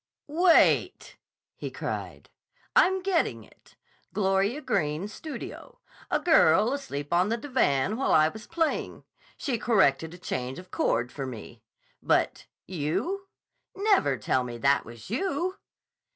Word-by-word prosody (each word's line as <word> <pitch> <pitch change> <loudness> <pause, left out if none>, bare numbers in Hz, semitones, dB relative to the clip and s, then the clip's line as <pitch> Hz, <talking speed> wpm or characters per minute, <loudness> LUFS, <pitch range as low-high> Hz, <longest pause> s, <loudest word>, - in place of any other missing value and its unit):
"Wait!" 335 +3 +3 0.4
he - - -6
cried. - - -6 0.4
"I'm 375 +1 +4
getting 335 - 0
it! - - -23 0.4
Gloria 195 +5 +1
Greene's 170 - -2
studio. 320 - -8 0.3
A - - +2
girl 225 - +4
asleep 160 - -5
on 180 +3 +3
the 230 - 0
divan, 220 - +1
while 270 - 0
I 155 0 +6
was 220 +5 -11
playing. 330 -2 -2 0.3
She 250 -6 -2
corrected 165 - +2
a - - -12
change 130 -7 -4
of 180 0 -11
chord 120 +2 0
for 135 -2 -5
me. 115 -2 -9 0.4
But—you! 190 - -2 0.5
Never 390 - +2
tell 125 +4 0
me 120 -1 -6
that 140 +4 +2
was 115 - -11
you!" 370 - -1
195 Hz, 125 wpm, -27 LUFS, -, 0.5 s, I